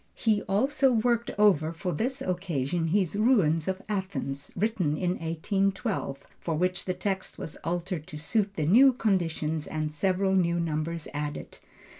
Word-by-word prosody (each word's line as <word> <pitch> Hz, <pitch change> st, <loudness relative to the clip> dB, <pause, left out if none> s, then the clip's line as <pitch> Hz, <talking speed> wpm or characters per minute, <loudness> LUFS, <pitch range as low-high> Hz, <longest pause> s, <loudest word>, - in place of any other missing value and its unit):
He 215 Hz, -3 st, +2 dB
also 265 Hz, +7 st, +3 dB
worked 235 Hz, +1 st, +1 dB
over 185 Hz, -7 st, +4 dB
for 180 Hz, +2 st, -3 dB
this 255 Hz, +8 st, -2 dB
occasion 175 Hz, -3 st, -1 dB
his 185 Hz, +1 st, +1 dB
Ruins 200 Hz, -9 st, +3 dB
of 190 Hz, 0 st, -2 dB
Athens, 190 Hz, -9 st, -3 dB
written 185 Hz, -7 st, 0 dB
in 180 Hz, +1 st, 0 dB
1812, 190 Hz, -, -1 dB, 0.2 s
for 165 Hz, -, -2 dB
which 180 Hz, +3 st, -1 dB
the 185 Hz, -, -1 dB
text 190 Hz, 0 st, -3 dB
was 155 Hz, -, -6 dB
altered 175 Hz, -1 st, -3 dB
to 155 Hz, -5 st, -8 dB
suit 200 Hz, +6 st, 0 dB
the 155 Hz, -, -1 dB
new 255 Hz, -, +7 dB
conditions 165 Hz, -8 st, 0 dB
and 155 Hz, -1 st, -3 dB
several 190 Hz, +4 st, +1 dB
new 175 Hz, -2 st, +2 dB
numbers 165 Hz, 0 st, -2 dB
added. 145 Hz, 0 st, -5 dB
180 Hz, 150 wpm, -28 LUFS, 160-205 Hz, 0.2 s, new